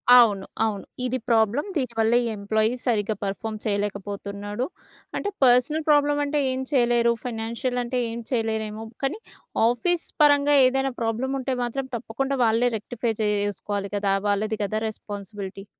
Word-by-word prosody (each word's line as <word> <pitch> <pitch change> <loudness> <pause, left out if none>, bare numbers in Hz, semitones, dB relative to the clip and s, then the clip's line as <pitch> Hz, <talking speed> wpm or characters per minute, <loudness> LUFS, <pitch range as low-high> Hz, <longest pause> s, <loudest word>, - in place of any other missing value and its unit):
అవును. 210 -6 +6 0.2
అవును. 205 -3 -3 0.2
ఇది 255 +1 0
ప్రాబ్లమ్. 230 - +2
దీనివల్లే 230 -3 +2
ఈ - - -1
ఎంప్లాయి 215 +3 +1
సరిగ్గా 215 -3 +1
పర్‌ఫా‌మ్ 215 +2 -3
చేయలేకపోతున్నాడు. 205 +2 -3 0.5
అంటే 410 - -1
పర్సనల్ 255 +5 +4
ప్రాబ్లమంటే 290 0 +3
ఏం 260 - -2
చేయలేరు, 240 -3 +3
ఫైనాన్షియలంటే 245 +2 -2
ఏం 235 - -5
చేయలేరేమో, 220 -2 -1 0.2
కానీ 275 +11 -1 0.5
ఆఫీస్ 340 +8 +1 0.2
పరంగా 290 0 +5
ఏదైనా 270 +1 0
ప్రాబ్లముంటే 260 +4 -1
మాత్రం 260 +3 -3
తప్పకుండా 265 +4 -2
వాళ్ళే 230 +2 +3
రెక్టిఫై 225 +2 -3
చేయేసుకోవాలి 205 -1 -1
కదా! 200 -1 +1 0.2
వాళ్ళది 215 +2 0
కదా 215 +2 -1
రెస్పాన్సిబిలిటీ. 200 -2 -7
225 Hz, 120 wpm, -25 LUFS, 210-255 Hz, 0.5 s, అవును